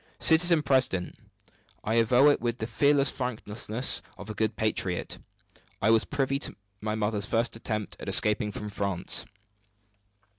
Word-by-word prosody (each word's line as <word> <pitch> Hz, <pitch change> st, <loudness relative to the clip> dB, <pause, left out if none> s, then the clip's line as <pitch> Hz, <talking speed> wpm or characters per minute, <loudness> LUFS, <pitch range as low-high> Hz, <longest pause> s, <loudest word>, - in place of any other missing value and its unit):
"Citizen 165 Hz, -1 st, +5 dB
president, 130 Hz, -10 st, +1 dB, 0.7 s
I 110 Hz, -, -2 dB
avow 120 Hz, +5 st, +4 dB
it 145 Hz, -, +1 dB
with 120 Hz, 0 st, -2 dB
the 110 Hz, -, -4 dB
fearless 140 Hz, +5 st, +2 dB
frankness 120 Hz, -1 st, -1 dB, 0.2 s
of 105 Hz, +2 st, -8 dB
a -, -, -6 dB
good 110 Hz, +1 st, -2 dB
patriot; 95 Hz, -4 st, -2 dB, 0.6 s
I 110 Hz, -, +2 dB
was 115 Hz, -1 st, +3 dB
privy 135 Hz, -1 st, -2 dB
to -, -, -2 dB, 0.3 s
my 105 Hz, 0 st, -3 dB
mother's 105 Hz, -1 st, -2 dB
first 115 Hz, -1 st, -1 dB
attempt 110 Hz, -2 st, -5 dB
at -, -, -6 dB
escaping 105 Hz, 0 st, +3 dB
from 105 Hz, +1 st, -7 dB
France." 100 Hz, -3 st, +1 dB
115 Hz, 145 wpm, -27 LUFS, 105-130 Hz, 0.7 s, Citizen